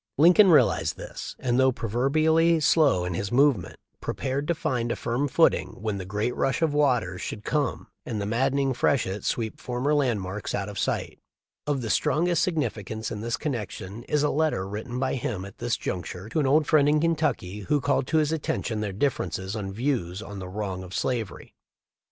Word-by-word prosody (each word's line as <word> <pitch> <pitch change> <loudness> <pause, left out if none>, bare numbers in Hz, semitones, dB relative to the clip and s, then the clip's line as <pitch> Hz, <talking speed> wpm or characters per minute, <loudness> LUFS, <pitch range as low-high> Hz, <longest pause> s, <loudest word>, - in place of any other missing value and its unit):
Lincoln 180 +7 +7
realized 160 - +4
this - - -7
and, 125 0 0
though 130 0 +5
pro 115 - -5
verbially 155 +8 +3
slow 145 - +3
in 90 - -2
his 100 +3 -3
movements, 130 -7 +2 0.2
prepared 135 +2 -2
to 170 - +1
find 120 -5 -1
a - - 0
firm 120 +5 -1
footing 95 - +2
when 105 -1 -2
the 95 - -5
great 105 +5 -1
rush 135 +5 0
of 155 -3 +2
waters 125 -12 +1
should 105 - -5
come 145 -4 -1 0.2
and 110 -4 -4
the 100 - -2
maddening 135 +5 +1
freshet 110 -6 0
sweep 110 -2 -2
former 125 +4 -1
landmarks 105 -8 -1
out 100 0 -3
of 100 - -6
sight. - - -2 0.5
Of 140 -4 0
the 110 - -1
strongest 170 +1 +2
signifi 140 - -1
cance 110 +3 -5
in 105 - -4
this 115 +2 -2
connection 110 - -5
is 150 -1 +1
a 150 - +2
letter 150 -11 0
written 110 +5 -5
by 130 0 0
him 105 -6 -3
at 100 - -12
this - - -1
juncture 90 +3 -5
to 155 - -1
an 145 - +2
old 150 +3 +4
friend 145 -2 +4
in 150 +1 +3
Kentucky,* 155 - 0
who 125 +9 0
called 140 -1 0
to 160 - +1
his 155 -1 +2
attention 125 -8 -2
their 105 -2 -2
differences 100 -4 -2
of 105 -2 -3
views 100 -4 -2
on 100 0 -8
the 90 -1 -7
wrong 95 -2 -4
of 95 0 -8
slavery. 115 -8 -3
120 Hz, 195 wpm, -26 LUFS, 100-145 Hz, 0.5 s, Lincoln